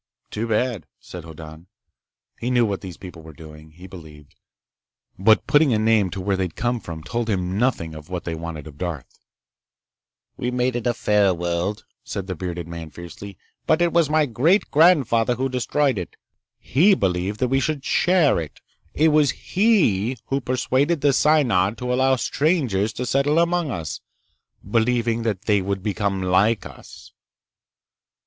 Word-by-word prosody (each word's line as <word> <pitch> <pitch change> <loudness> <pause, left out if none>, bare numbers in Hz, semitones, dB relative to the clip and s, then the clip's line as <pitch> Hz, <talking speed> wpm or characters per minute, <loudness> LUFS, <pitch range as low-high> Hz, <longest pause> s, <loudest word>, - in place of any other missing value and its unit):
"Too 110 +2 -3
bad," 115 -4 -1
said 90 -2 -10
Hoddan. 80 +1 -11 0.7
He 120 - -3
knew 120 -2 +3
what 100 -3 -3
these 95 -4 -9
people 90 -3 -11
were 80 0 -12
doing, 75 0 -13
he 90 +3 -13
believed, 80 -6 -13 0.9
but 110 +3 +4
putting 145 -3 +4
a - - +2
name 110 -3 +2
to 100 - -6
where 95 +1 0
they'd 95 -3 -3
come 120 0 -1
from 80 -6 -8
told 115 +8 -3
him 90 -2 -1
nothing 110 -10 0
of 75 0 -11
what 90 -1 -4
they 85 - -4
wanted 80 -2 -6
of 75 -2 -13
Darth. 85 -8 -6 1.2
"We 125 - -2
made 125 0 -1
it 120 -1 -2
a 120 - +1
fair 105 -5 +2
world," 85 +4 -3 0.2
said 100 -3 -5
the 95 - -4
bearded 90 -1 -5
man 85 -1 -7
fiercely. 85 +4 -10 0.3
"But 155 - +3
it 175 -1 +1
was 170 -3 +3
my 155 0 +3
great 145 - +1
grandfather 135 -8 +4
who 130 +2 -2
destroyed 130 -1 0
it. 90 - -8 0.4
He 185 - +3
believed 95 - -1
that 125 - 0
we 135 +1 +2
should 145 0 -2
share 175 - +3
it. 75 -5 -8 0.4
It 160 +2 +4
was 150 -2 +3
he 135 - +1
who 135 +1 0
persuaded 130 +5 0
the 145 -1 +3
Synod 120 -10 +2
to 125 0 -2
allow 130 +1 +3
strangers 130 - 0
to 125 - -4
settle 140 +5 +1
among 170 -1 +1
us, 80 - -5 0.7
believing 115 +1 +1
that 110 -4 -2
they 105 -3 +2
would 95 0 -3
become 100 -2 -1
like 100 +4 +2
us." - - -13
110 Hz, 170 wpm, -22 LUFS, 90-130 Hz, 1.2 s, but